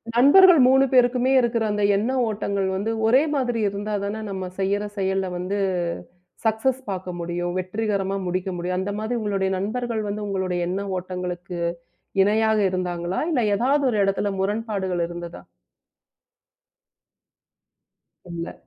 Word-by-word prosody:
நண்பர்கள் 330 +7 +7
3 265 +1 +5
பேருக்குமே 250 0 +3
இருக்கற, 235 -2 +1
அந்த 210 0 -1
எண்ண 220 +6 0 0.2
ஓட்டங்கள் 200 -2 -1
வந்து, 205 +4 -1 0.2
ஒரே 255 +5 +5
மாதிரி 245 -4 0
இருந்தா 205 +2 -4
தானா, 205 +2 -3
நம்ம 190 -1 -4
செய்யிற 200 +2 0
செயல்ல 190 -1 0
வந்து 185 +3 -3 0.9
சக்சஸ் 250 +4 +1
பாக்க 185 -1 -4
முடியும். 175 +1 -3
வெற்றிகரமா, 195 0 -2
முடிக்க 185 +1 -2
முடியும். 180 +1 -2
அந்த 195 +2 -2
மாதிரி, 230 +3 -2
உங்களோட 195 -2 0
நண்பர்கள் 225 +3 -2
வந்து 210 +1 -4
உங்களோட 190 -2 -2
எண்ண 190 +2 -2 0.2
ஓட்டங்களுக்கு 180 -1 -5 0.6
இணையாக 220 +2 +3
இருந்தாங்களா? 180 -1 -2
இல்ல, 250 -6 +2
எதாவது 275 +5 +2
ஒரு 215 - -1
இடத்துல 200 +1 0
முரண்பாடுகள் 195 -4 -1
இருந்ததா? 175 0 -8 2.9
இல்ல. 170 0 -5
200 Hz, 125 wpm, -23 LUFS, 185-225 Hz, 2.9 s, நண்பர்கள்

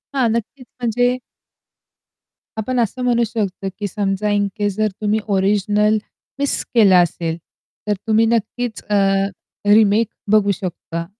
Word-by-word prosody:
हां, 255 -3 +3
नक्कीच 235 +3 -4 0.2
म्हणजे 245 +2 +1 1.4
आपण 245 +4 -1
असं 235 +2 -1
म्हणू 240 -1 +2
शकतो, 200 -4 -3
की 205 - -2
समजा 200 +1 -1
इन 205 -1 +1
केस 205 -2 -1
जर 215 0 +2
तुम्ही 210 +1 +1 0.2
ओरिजिनल 210 +2 +2 0.4
मिस 285 0 0
केलं 210 -6 +6
असेल, 170 -2 +1 0.5
तर 210 - +2
तुम्ही 220 +1 +4
नक्कीच 230 +1 -1
अ, 210 - +2 0.7
रिमेक 215 +1 +5 0.2
बघू 210 -2 +4
शकता. 170 -2 -5
210 Hz, 130 wpm, -19 LUFS, 200-230 Hz, 1.4 s, केलं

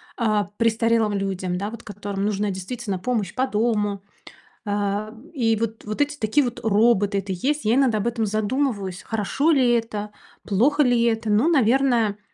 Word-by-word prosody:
а, 215 -3 +1
престарелым 230 -1 +2
людям, 190 -2 -2
да, 205 +3 -3
вот 230 0 -9
которым 200 -1 -5
нужна, 205 0 0
действительно, 195 +1 -4
помощь 220 -5 -2
по 260 +1 0
дому. 210 -3 0 0.6
А, 205 +1 -2 0.2
и 225 -5 +1
вот 225 0 -4
вот 215 +4 -5
эти 290 0 0
такие, 235 +6 +2
вот, 245 0 -4
роботы- 210 -2 +3
это 195 0 -3
есть. 275 +10 -1
Я 220 - +3
иногда 255 -5 +3
об 210 - -1
этом 230 -2 -1
задумываюсь. 215 -3 -1
Хорошо 225 +8 -1
ли 270 -6 +4
это? 210 -3 -2 0.3
Плохо 275 +9 +2
ли 245 -2 +3
это? 225 -2 0
Ну, 220 +10 +3
наверное, 240 -6 +2
220 Hz, 165 wpm, -23 LUFS, 205-240 Hz, 0.6 s, ли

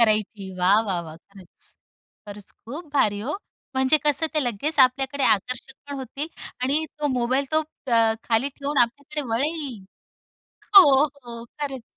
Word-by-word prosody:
करायची. 215 -3 +1
वाह, 195 +4 +4
वाह, 190 -5 -2
वाह! 160 -1 -10
खरंच. 190 0 -13 0.5
खरंच 205 -1 -9
खूप 295 +5 -8
भारी 210 -7 +2
हो. 275 - -3 0.4
म्हणजे 265 +3 +3
कसं, 295 +2 +2
ते 305 - +2
लगेच 280 +7 -2
आपल्याकडे 265 +2 +3
आकर्षित 250 +6 -6
पण 285 - -4
होतील 275 +4 -5 0.4
आणि 290 +5 +1
तो 295 - 0
मोबाईल 255 +3 +1
तो 315 - +4 0.3
अ, 225 -1 +4
खाली 235 +4 +1
ठेवून 280 +1 -3
आपल्याकडे 285 +5 -3
वळेल. 275 -5 -2 0.9
हो, 390 - +12 0.2
हो, 240 -6 -8
खरंच. 270 -4 -4
255 Hz, 145 wpm, -24 LUFS, 220-285 Hz, 0.9 s, हो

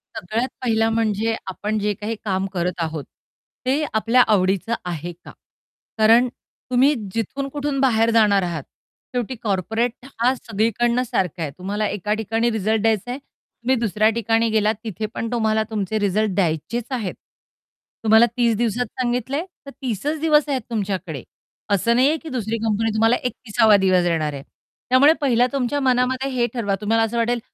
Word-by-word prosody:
सगळ्यात 225 +8 -2
पहिला 225 -2 +2
म्हणजे 225 0 0
आपण 210 +3 -3
जे 205 0 0
काही 210 +3 -4
काम 190 -1 0
करत 180 0 -2
आहोत 160 -3 -3 0.6
ते 275 +4 +1
आपल्या 230 +3 +4
आवडीचं 195 +3 +1
आहे 175 -1 -4
का? - - -9 0.7
कारण 225 +3 +5
तुम्ही 260 +3 0 0.2
जिथून 250 +5 -2
कुठून 285 -1 -2
बाहेर 230 -4 +3
जाणार 210 -4 +4
आहात 170 -5 -3 0.5
शेवटी 245 +1 -2
कॉर्पोरेट 225 +5 -1
हा 245 +2 +3
सगळीकडनं 235 +2 0
सारखा 185 -7 -2
आहे. 150 -3 -2
तुम्हाला 205 +3 -2
एका 205 +1 -2
ठिकाणी 225 +2 0
रिझल्ट 220 0 0
द्यायचाय 225 +3 0
तुम्ही 255 +3 -4
दुसऱ्या 220 -2 +2
ठिकाणी 225 0 +1
गेलात 215 0 +2
तिथे 215 -1 -4
पण 230 +1 -4
तुम्हाला 220 -2 +1
तुमचे 215 -1 -2
रिझल्ट 205 +1 +1
द्यायचेच 190 +6 -1
आहेत. 225 -8 -2 0.9
तुम्हाला 220 +1 +6
30 235 -2 +3
दिवसात 235 +1 0 0.2
सांगितलंय 250 +6 -1 0.2
तर - - -8
30चं 265 +6 -2
दिवस 300 -1 +3
आहेत 265 -2 0
तुमच्याकडे 190 - -3 0.5
असं 230 +5 +2
नाहीये 275 +6 +3
की 320 - -8
दुसरी 230 -3 -2
कंपनी 225 0 +1
तुम्हाला 225 +2 +3
31सावा 225 -3 +2
दिवस 185 -1 +4
देणार 160 -4 0
आहे. 140 -1 -7 0.5
त्यामुळे 270 +5 +6
पहिला 250 -3 +3
तुमच्या 275 +1 0
मनामध्ये 260 +1 +1
हे 245 -2 +1
ठरवा 205 -5 -1
तुम्हाला 225 +2 +2
असं 225 +1 -2
वाटेल 235 +1 +1
225 Hz, 155 wpm, -22 LUFS, 205-245 Hz, 0.9 s, तुम्हाला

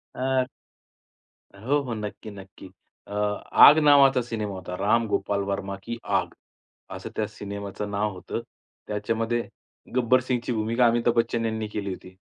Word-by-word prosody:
अ, 130 0 +1 1.2
हो, 145 +3 +2
हो, 125 -3 -4
नक्की, 105 0 -6
नक्की. 95 -1 -12 0.4
अ, 100 - -11 0.5
आग 150 +2 +8
नावाचा 135 -2 +6
सिनेमा 110 -4 -4
होता, 90 -1 -7
राम 115 +4 +2
गोपाल 100 0 0
वर्मा 100 0 -3
की 120 0 -5 0.2
आग, - - -5 0.6
असं - - -8
त्या - - 0
सिनेमाचं 100 0 -6
नाव 105 +1 -1
होतं. 90 +5 -5 0.5
त्याच्यामध्ये 115 +3 -1 0.5
गब्बर 125 +1 +4
सिंगची 120 0 0
भूमिका, 115 +2 +2
अमिताभ 120 0 +2
बच्चन 115 0 +1
यांनी 110 -1 -2
केली 100 -2 -4
होती. 90 0 -11
110 Hz, 140 wpm, -25 LUFS, 100-120 Hz, 1.2 s, आग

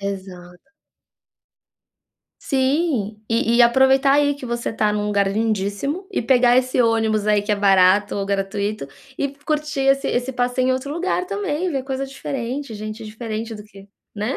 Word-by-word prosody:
Exato. 185 - -8 1.7
Sim, 265 - 0
e 230 +1 +1
e - - +8
aproveitar 265 +3 +4
aí 285 0 +3
que 280 - -10
você 235 -1 -3
está 215 -1 0
num 210 0 -1
lugar 200 -1 +1
lindíssimo 220 - -2
e - - -1
pegar 245 0 +4
esse 255 0 +2
ônibus 220 -2 +1
aí, 210 -1 +3
que 210 +1 -1
é 205 - +1
barato 195 0 +4
ou 200 -1 -2
gratuito, 200 -2 -2 0.3
e 280 - -1 0.2
curtir 300 -2 -2
esse 275 0 +2
esse 245 +2 -1
passeio 250 +1 0
em - - +3
outro 260 +2 -3
lugar 360 +2 -1
também, 370 -4 -2
ver 270 -3 -2
coisa 270 0 -3
diferente, 270 -2 -5
gente 215 +2 -7
diferente 220 +1 -5
do 210 - -9
que 200 -1 -16 0.3
né. 215 +5 -2
235 Hz, 165 wpm, -21 LUFS, 210-270 Hz, 1.7 s, e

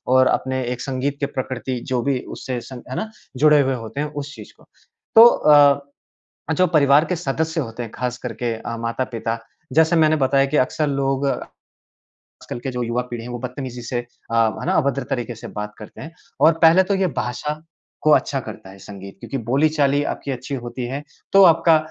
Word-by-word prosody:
और 130 0 +6
अपने 130 0 0
एक 125 - -8
संगीत 135 +1 -2
की 140 - 0
प्रकृति 130 -2 -4
जो 125 - +1
भी 135 -2 0 0.2
उससे 125 -2 -4
सं 130 0 -10
है 130 - -4
ना? 220 - -3 0.3
जुड़े 150 +1 +5
हुए 135 -1 0
होते 115 +3 -7
हैं 150 - -1
उस 145 +1 -8
चीज़ - - -12
को। - - -21 0.5
तो 225 +1 +11
अ, 155 -10 +4 1.0
अ, - - +2
जो 185 +2 +3
परिवार 150 -1 +4
के 180 - -1
सदस्य 160 +1 -2
होते 115 -1 -6
हैं 110 - -8
ख़ास 125 -1 -3
करके 120 -1 -3
अ, 115 +1 -6
माता-पिता, 115 -1 -3 0.3
जैसे 160 +2 +4
मैंने 155 -1 +4
बताया 135 +1 +3
कि 145 +2 -1
अक्सर 150 +4 +1
लोग, 135 0 0
आजकल - - -5 0.9
की 135 +1 -4
जो 125 -1 -3
युवा 120 +1 -1
पीढ़ी 115 -1 -5
है 125 - -8
वो 120 - -5
बत्तमीज़ी 125 -1 -6
से 120 +1 -3
अ, 120 -1 -8
है 110 -4 +1
ना? 185 - +1
अभद्र 140 -4 +1
तरीके 120 -2 -3
से - - -9
बात 105 0 -6
करते 105 - -11
हैं। 160 - -8 0.3
और 160 +1 +7
पहले 170 +3 +7
तो 200 +1 0
ये 190 -1 +1
भाषा 150 +5 -4 0.4
को 155 - +3
अच्छा 140 -2 +3
करता 110 -5 -9
है 95 - -13
संगीत 100 -1 -10
क्योंकि 135 - -5
बोली-चाली 145 +1 +2
आपकी 140 - -4
अच्छी 130 +2 -5
होती 120 0 -6
है। 135 +3 -4 0.3
तो 195 0 +8
आपका 165 -1 +6
135 Hz, 205 wpm, -21 LUFS, 120-150 Hz, 1.0 s, तो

